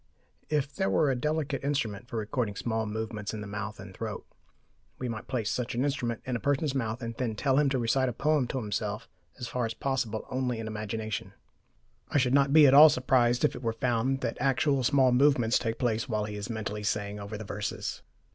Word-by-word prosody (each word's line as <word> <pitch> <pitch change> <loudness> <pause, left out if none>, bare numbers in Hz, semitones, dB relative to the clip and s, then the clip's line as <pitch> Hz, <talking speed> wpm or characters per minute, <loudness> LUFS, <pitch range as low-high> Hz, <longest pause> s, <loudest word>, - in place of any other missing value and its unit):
If 150 -2 0
there 190 -1 0
were 150 -4 +3
a - - 0
delicate 150 +1 -1
instrument 120 -7 -2
for 120 - -5
recording 110 0 -2
small 110 +1 -2
movements 110 0 -4
in 105 - -5
the - - -6
mouth 105 +1 -5
and - - -10
throat, - - -5 0.7
we 125 - -4
might 115 -2 -5
place 120 -5 -2
such 125 -2 -2
an 125 - +1
instrument 120 -5 -2
in 130 - -2
a - - -1
person's 145 +1 0
mouth 120 -2 -2
and 115 0 -4
then 120 -4 -1
tell 135 +4 +2
him 145 -2 +3
to 135 - 0
recite 130 +2 +1
a - - -4
poem 150 +1 +1
to 130 - -3
himself, 105 -1 -3 0.3
as 125 -3 -5
far 125 0 -2
as 115 0 -2
possible 125 -5 -2
only 125 -2 -1
in 115 - -5
imagination. 110 -1 -4 0.8
I - - +1
should 125 -2 +2
not 140 0 +4
be 155 0 +8
at 135 - +6
all 150 +3 +10
surprised 125 -2 +2
if - - +1
it - - -7
were 115 -2 -1
found 125 +3 0
that - - -2
actual 135 +1 +2
small 130 0 +4
movements 125 -3 +4
take 115 -1 -2
place 115 0 -1
while 105 -2 0
he 105 -1 -6
is 105 +3 -5
"mentally" 105 -2 -4
saying 105 0 -2
over 100 +1 -6
the 110 - -6
verses. 105 +2 -4
120 Hz, 220 wpm, -29 LUFS, 110-135 Hz, 0.8 s, all